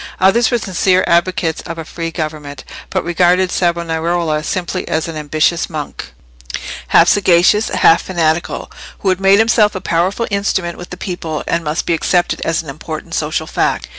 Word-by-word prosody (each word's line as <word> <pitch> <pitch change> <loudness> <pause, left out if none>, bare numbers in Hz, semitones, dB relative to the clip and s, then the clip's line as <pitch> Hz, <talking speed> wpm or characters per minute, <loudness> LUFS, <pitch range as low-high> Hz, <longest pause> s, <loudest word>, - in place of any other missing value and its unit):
Others 220 +5 +4
were 240 - +2
sincere 185 -3 +1
advocates 170 -1 +1
of 165 - -7
a 165 - -6
free 165 +1 -5
government, 155 -4 -5 0.3
but - - -1
regarded 180 +2 +2
Savonarola 170 -2 0
simply 180 +3 -3
as 160 +1 -1
an 165 - -6
ambitious 155 +2 0
monk—half - - -2
sagacious, 195 +2 +4
half 165 - +4
fanatical—who 170 +2 -2
had 185 0 0
made 195 +1 +5
himself 220 -1 +3
a - - -2
powerful 185 +6 0
instrument 190 -3 -1
with 175 - -9
the 180 - -8
people, 170 -5 -4
and 170 0 0
must 150 +1 -2
be 170 - +1
accepted 175 +2 0
as 165 0 -1
an 150 - -10
important 155 +3 -7
social 155 0 -1
fact. - - -1
170 Hz, 160 wpm, -16 LUFS, 160-185 Hz, 0.3 s, made